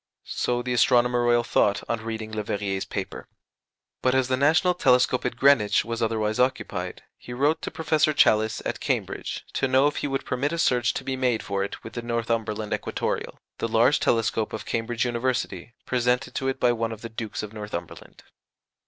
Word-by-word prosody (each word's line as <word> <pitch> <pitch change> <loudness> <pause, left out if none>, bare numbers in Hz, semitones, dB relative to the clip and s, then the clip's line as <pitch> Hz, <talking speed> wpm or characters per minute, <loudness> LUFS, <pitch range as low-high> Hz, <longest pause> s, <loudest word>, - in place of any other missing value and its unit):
So 120 0 -1
the 125 0 -2
Astronomer 120 0 +3
Royal 120 0 +3
thought 105 -4 +1
on 115 -1 -2
reading 110 -1 -5
Leverrier's 100 -2 -2
paper. - - -5 0.7
But 130 0 +2
as 130 -1 +2
the 130 - +3
national 160 +7 +3
telescope 125 -6 +3
at 125 - -1
Greenwich 125 -7 +4
was 115 0 -4
otherwise 110 0 0
occupied, 95 -8 -1 0.2
he 120 - -9
wrote 145 +5 +1
to - - -4
Professor 155 -1 +1
Challis, 110 -6 +3
at - - -2
Cambridge, - - -3
to 135 - +1
know 130 +2 +4
if 145 0 +1
he - - -1
would 135 -1 -2
permit 140 +5 -1
a - - -2
search 125 -6 +2
to - - -3
be 135 - -2
made 125 -3 0
for 100 -1 -1
it 100 - -6
with 115 - -9
the 120 - -4
Northumberland 115 -2 -2
Equatoreal, - - -3 0.2
the - - 0
large - - +3
telescope 115 -1 +1
of 110 - -5
Cambridge 115 +1 -1
University, 120 -4 -2
presented 125 +1 0
to 135 - -2
it 135 0 -1
by 125 - +4
one 115 -1 -1
of 110 0 -8
the - - -4
Dukes 110 -1 -5
of 105 0 -7
Northumberland. 105 -1 -7
120 Hz, 190 wpm, -25 LUFS, 110-130 Hz, 0.7 s, Greenwich